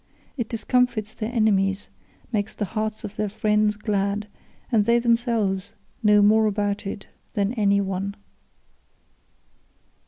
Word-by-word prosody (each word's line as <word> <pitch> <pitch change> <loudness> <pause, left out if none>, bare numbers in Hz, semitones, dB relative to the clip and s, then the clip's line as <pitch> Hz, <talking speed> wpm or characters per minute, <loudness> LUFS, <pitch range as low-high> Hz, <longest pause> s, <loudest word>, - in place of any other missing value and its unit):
It 240 -6 -3
discomfits 230 -2 0
their 220 +1 -4
enemies, 200 -4 +1 0.5
makes 210 -1 -1
the 210 - -2
hearts 215 +1 -3
of 205 - -7
their 210 -1 -1
friends 210 +1 +1
glad, 205 -1 -1 0.4
and 215 -4 +3
they 235 +2 +4
themselves 230 -5 +1 0.3
know 210 -2 +5
more 215 +1 +5
about 205 -1 -1
it 195 0 -6 0.3
than 205 +1 0
any 200 -4 +2
one." 195 +1 -3
210 Hz, 125 wpm, -24 LUFS, 200-220 Hz, 0.5 s, know